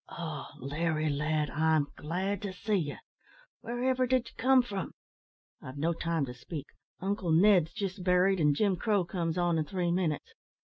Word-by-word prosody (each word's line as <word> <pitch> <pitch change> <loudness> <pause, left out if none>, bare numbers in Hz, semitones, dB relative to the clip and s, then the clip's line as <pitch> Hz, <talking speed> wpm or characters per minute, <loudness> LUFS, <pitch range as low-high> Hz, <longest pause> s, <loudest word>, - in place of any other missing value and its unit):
"Oh! 160 -4 -5
Larry, 155 +3 -1
lad, 150 +1 0
I'm 155 -1 +2
glad 185 +6 -2
to 200 -2 -4
see 210 +4 -3
ye. 150 -7 -1 0.6
Wherever 255 +2 0
did 255 -1 +1
ye - - -22
come 255 +1 +4
from? 200 -6 -5 0.7
I've 130 +2 -9
no 165 +4 +1
time 165 -3 -1
to 125 - -7
speak. 145 +3 -7 0.3
Uncle 190 -2 -1
Ned's 175 -1 +5
jist 190 -2 -4
buried, 180 +1 +3
and 150 -2 +3
Jim 195 +1 +2
Crow 205 -1 +1
comes 170 -1 -2
on 175 -2 +2
in 155 - 0
three 175 0 -1
minutes. 170 -4 -1
175 Hz, 170 wpm, -30 LUFS, 155-195 Hz, 0.7 s, Ned's